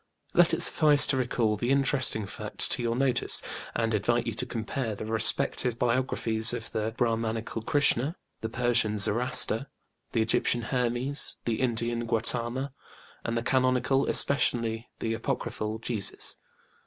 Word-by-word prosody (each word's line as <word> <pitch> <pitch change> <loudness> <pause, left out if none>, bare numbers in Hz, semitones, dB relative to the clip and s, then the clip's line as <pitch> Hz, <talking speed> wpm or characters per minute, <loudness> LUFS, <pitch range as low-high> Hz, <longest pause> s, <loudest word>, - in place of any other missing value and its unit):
Let - - +4
it - - +5
suffice 150 -2 +5
to 135 - 0
recall 120 -4 -1
the 120 +4 -3
interesting 135 -5 +2
fact - - -2
to - - +2
your 115 -1 -1
notice, 130 -2 +1 0.3
and 115 0 -1
invite 115 +3 0
you 115 - -3
to 125 +4 -3
compare 115 -1 -4
the 105 - -7
respective 115 +2 0
biographies 120 -2 +3
of 115 -2 -8
the 110 0 -3
BrÄhmanĖĢical 115 -1 -2
KrĖĢsĖĢhnĖĢa, 145 +1 +2 0.3
the 110 - -4
Persian 120 -3 +1
Zoroaster, 115 +4 +3 0.5
the 115 - +1
Egyptian 115 +1 0
Hermes, 125 +3 -2
the 115 0 -2
Indian 120 -1 -2
GautĖĢama, 120 +4 -1 0.5
and 115 0 -3
the 115 - -2
canonical, 130 +1 +1
especially 115 -4 +1
the 115 - -3
apocryphal, 110 -1 -4
Jesus. 110 -4 -2
120 Hz, 140 wpm, -27 LUFS, 110-125 Hz, 0.5 s, it